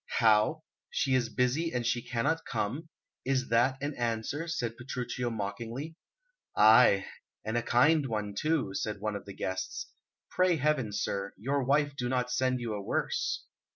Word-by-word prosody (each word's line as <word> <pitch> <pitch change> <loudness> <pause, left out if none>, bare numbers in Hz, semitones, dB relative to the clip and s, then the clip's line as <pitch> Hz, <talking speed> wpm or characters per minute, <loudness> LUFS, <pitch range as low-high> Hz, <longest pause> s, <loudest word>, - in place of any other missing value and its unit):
"How? 110 +8 +4 0.3
She 135 - 0
is 125 -2 +2
busy 130 +8 0
and 120 -1 -2
she 120 +1 +1
cannot 125 +8 -1
come! 125 +8 -3 0.3
Is 130 -1 0
that 120 +3 +3
an 145 +1 -1
answer?" 120 +6 -2
said 120 -8 -2
Petruchio 125 0 -3
mockingly. 115 +8 -5 0.6
"Ay, 110 -2 +7 0.4
and 110 +1 -2
a 120 - +2
kind 145 +5 +3
one 105 -3 -3
too," 145 -3 0
said 105 +1 -3
one 105 0 -2
of 100 - -6
the 100 - -8
guests. 95 0 -4 0.4
"Pray 185 -1 +3
heaven, 145 -6 +1
sir, 100 -1 -2
your 135 +7 0
wife 145 +2 +2
do 125 -3 -2
not 125 -1 0
send 130 0 +1
you 115 -3 -3
a 105 - -4
worse." - - -1
125 Hz, 160 wpm, -30 LUFS, 110-140 Hz, 0.6 s, Ay